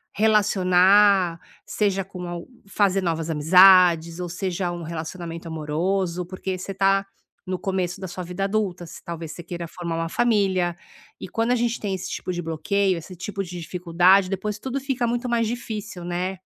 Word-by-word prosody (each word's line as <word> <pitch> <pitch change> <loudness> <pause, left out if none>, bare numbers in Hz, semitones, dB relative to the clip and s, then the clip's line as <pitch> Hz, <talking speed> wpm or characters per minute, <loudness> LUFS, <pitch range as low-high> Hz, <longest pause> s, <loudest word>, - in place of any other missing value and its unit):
relacionar, 195 -3 +4 0.3
seja 195 -2 0
com 185 -2 -9
alg 175 0 -6 0.2
fazer 195 -1 +2
novas 165 -2 -1
amizades, 170 +1 +6
ou 175 - -4
seja 180 0 -2
um 175 -1 -6
relacionamento 165 +1 -6
amoroso, 170 +4 -1
porque 185 +1 -4
você 195 +2 -6
tá 195 +1 +2 0.4
no 185 -1 -2
começo 185 -1 -2
da 190 - -4
sua 180 +1 -6
vida 180 +3 -4
adulta, 195 -4 -1
você, - - -11
talvez 165 -2 -6
você 175 - -9
queira 170 0 -6
formar 170 0 -5
uma 165 0 -2
família. 190 -6 +1 0.5
E - - -5
quando 230 +1 0
a - - +4
gente 240 0 0
tem 200 -2 -3
esse 185 - -6
tipo - - -4
de 175 - -3
bloqueio, 185 +4 0
esse 170 +3 -9
tipo 195 +3 -5
de 180 -1 -7
dificuldade, 180 +2 +3
depois 205 +2 -3
tudo 265 +4 -3
fica 260 -3 -1
muito 240 +1 -2
mais 230 -1 +1
difícil, 215 -6 -5
né? 180 +2 -3
185 Hz, 175 wpm, -24 LUFS, 175-200 Hz, 0.5 s, amizades